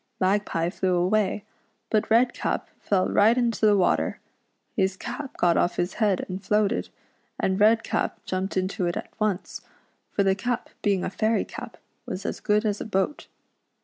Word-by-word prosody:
Mag 195 +2 +2
pie 165 +1 -1
.flew 185 -1 0
away, 195 +3 +1 0.5
but 215 -1 +1
Redcap 240 +2 +1
fell 190 -2 +1
right 220 +4 +4
into 230 -3 +2
the 205 -1 +5
water. 185 - +1 0.6
His 190 -1 +1
cap 255 +5 -6
got 170 -1 +3
off 175 - +2
his 175 +1 -1
head 205 -4 +2
and 185 +1 -6
floated, 210 +1 +1 0.5
and 190 +1 +1
Redcap 225 +2 +2
jumped 190 +1 -2
into 185 -1 0
it 175 - -1
at - - -7
once, 205 -3 -1 0.5
for 200 - +1
the 195 -1 +3
cap 240 +5 -3
being 195 -3 +1
a - - -2
fairy 220 +2 +1
cap - - -9 0.3
was 190 +2 -5
as - - -3
good 210 +1 +1
as 210 -1 0
a - - -4
boat. 195 +6 -1
200 Hz, 170 wpm, -26 LUFS, 185-215 Hz, 0.6 s, the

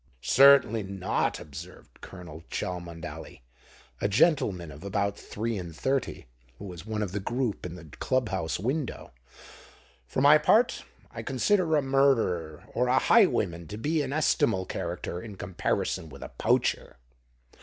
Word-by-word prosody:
"Certainly 135 -4 +6
not," 95 -1 -2
observed 80 +5 -11
Colonel 85 -4 -10
Cholmondeley, 85 -7 -6 0.6
a - - +2
gentleman 100 - +2
of 75 +4 -12
about 100 0 -1
three 110 +1 -4
and 85 -3 -8
thirty 135 - -2 0.3
who 100 - -9
was 90 0 -9
one 110 -1 -2
of 95 - -4
the 105 - -2
group 120 -2 -2
in 85 - -8
the 85 -2 -11
Club 125 - -1
House 90 -4 -2
window. 130 - -3 1.0
"For 65 - -3
my 145 +3 +7
part, 225 +10 +3 0.3
I - - -6
consider 185 -6 +1
a 150 - +2
murderer 115 - +1
or 125 +1 +1
a 130 +1 +3
highwayman 100 - +3
to 105 - -7
be 150 +7 0
an 135 -2 -3
estimable 115 -10 +1
character 90 -1 -4
in 105 -1 -9
comparison 90 -3 -2
with - - -10
a - - -7
poacher." - - 0
100 Hz, 145 wpm, -28 LUFS, 90-135 Hz, 1.0 s, my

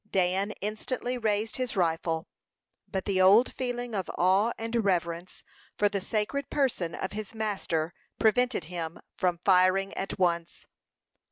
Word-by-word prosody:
Dan 190 +2 +1
instantly 240 +4 -2
raised 215 0 0
his 255 -2 -2
rifle; 165 -2 0 0.6
but 190 -2 -3
the 190 -2 +2
old 205 +7 +6
feeling 245 -2 -3
of 190 -3 -2
awe 190 +6 +4
and 230 0 -1
reverence 175 -2 -1 0.3
for 205 - +3
the 200 -1 -2
sacred 220 +8 -2
person 240 - 0
of 190 - -4
his 215 +1 -6
master 185 -7 -1 0.2
prevented 235 -2 +2
him 165 0 -5 0.2
from 180 -2 0
firing 190 +1 +4
at 195 - -4
once. 170 -2 0
195 Hz, 140 wpm, -28 LUFS, 180-225 Hz, 0.6 s, old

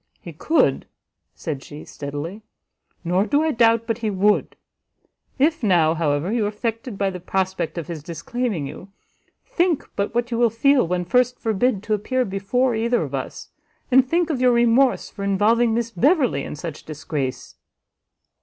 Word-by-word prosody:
"He 170 - -10
could," 315 - +1 0.5
said 145 -5 -5
she, 150 0 -10
steadily, 145 +8 -6 0.6
"nor 185 +4 +1
do 295 +2 +2
I 320 - +1
doubt 230 -2 +3
but 225 0 -2
he 220 -2 -1
would. 205 +1 +1 0.8
If 315 +4 +2
now, 175 -7 +3
however, 155 +2 0
you 230 -3 +1
are - - +1
affected 225 +2 -4
by 195 -1 0
the 180 - -7
prospect 185 -1 -2
of 170 - -3
his 165 -3 -6
disclaiming 180 - -3
you, 185 +7 -9 0.5
think 345 -4 0
but 200 +3 -2
what 240 +1 0
you 230 - -1
will 240 -1 +4
feel 255 0 +3
when 180 +1 -1
first 250 +5 +2
forbid 220 -1 0
to 215 - -1
appear 255 +5 0
before 210 +6 0
either 235 +2 +1
of - - -7
us! - - -5 0.4
and 260 +1 +7
think 340 +1 +1
of 265 -4 -2
your 250 -1 +5
remorse 240 +2 +3
for 200 - -8
involving 215 +4 +2
Miss 235 0 -1
Beverley 250 - +2
in - - -6
such 155 0 -7
disgrace!" 145 -3 -5
215 Hz, 170 wpm, -22 LUFS, 175-245 Hz, 0.8 s, and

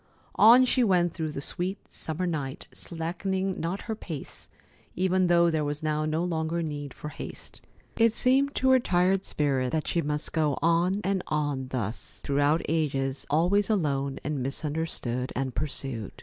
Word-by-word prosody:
On 240 +4 +7
she 255 0 +2
went 175 -5 +3
through 160 -3 -3
the 140 - -5
sweet 180 +6 -2 0.2
summer 160 +3 -3
night, 145 -5 -3
slackening 185 +3 -3
not 175 +4 -3
her 225 - -3
pace, 165 -9 -6 0.5
even 185 0 +2
though 170 -1 +4
there 155 -1 0
was 145 +1 -3
now 155 0 0
no 155 +2 0
longer 165 -1 -1
need 145 -3 -5
for 150 - -7
haste. - - -9 0.4
It 230 0 +5
seemed 270 +5 +2
to 260 0 +3
her 260 - +6
tired 185 -2 +2
spirit 135 -4 0
that 155 -1 -1
she 170 - +1
must 150 0 -2
go 150 -4 +1
on 170 +5 +2
and 195 0 0
on 145 -4 -1
thus, 120 -4 -3
throughout 145 +3 +2
ages, 140 -4 -1
always 180 +7 +2
alone 140 -9 0
and 145 -1 -2
misunderstood 135 -3 -3
and 130 -1 -2
pursued. 135 -6 -2
160 Hz, 165 wpm, -27 LUFS, 145-185 Hz, 0.5 s, On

